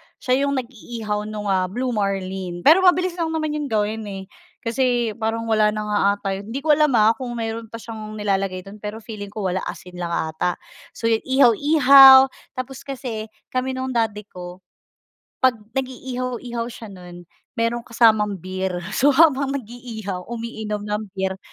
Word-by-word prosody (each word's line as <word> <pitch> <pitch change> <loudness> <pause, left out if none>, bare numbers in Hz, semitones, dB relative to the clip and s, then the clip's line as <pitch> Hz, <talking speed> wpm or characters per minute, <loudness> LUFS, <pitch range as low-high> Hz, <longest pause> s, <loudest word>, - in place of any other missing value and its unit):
Siya 255 +1 0
'yong 280 - 0
nag-iihaw 220 -4 -5
nung 210 -1 -3
ah, 185 -1 +1
Blue 250 +7 -2
Marlin, 190 -4 -3
pero 320 +5 +7
mabilis 365 -1 +4
lang 335 - 0
naman 310 -1 -1
'yong 295 - -3
gawin 220 -1 -1
eh. 195 -1 -6 0.4
Kasi, 240 -1 +1
parang 225 +1 -1
wala 215 -1 +3
na 215 - -2
nga 210 0 0 0.2
'ata 205 - -7
'yon, 200 - -10
hindi 275 - -3
ko 310 - +3
alam 300 0 +4
ah, 220 0 +5
kung 245 -2 -5
mayro'n 225 0 -4
pa 230 - -10
siyang 220 -2 -8
nilalagay 195 -3 -1
do'n 200 +3 -12
pero 210 +2 -7
feeling 210 -3 -7
ko 205 0 -6
wala 185 - -1
asin 180 0 -8
lang 175 - -2
'ata. 165 +1 -1 0.4
So 230 - -6
yu 225 - +3
ihaw-ihaw 270 +1 +7 0.2
tapos 255 +1 -6
kasi, 245 -5 -5 0.2
kami 255 +1 -1
nung 260 0 -3
daddy 220 -3 -1
ko, 180 -1 -10 0.8
pag 260 -1 +4 0.3
nag-iihaw-ihaw 250 -2 -4
siya 230 -2 -9
nun, 180 -2 -11 0.3
merong 230 +1 -1
kasamang 220 -3 +3
beer. 185 0 -4
So 275 +6 +3
habang 280 -2 +4
nag-iihaw 220 -7 -6
umiinom 220 -3 -5
ng 210 +1 -3
beer 190 0 -2
225 Hz, 165 wpm, -22 LUFS, 205-255 Hz, 0.8 s, pero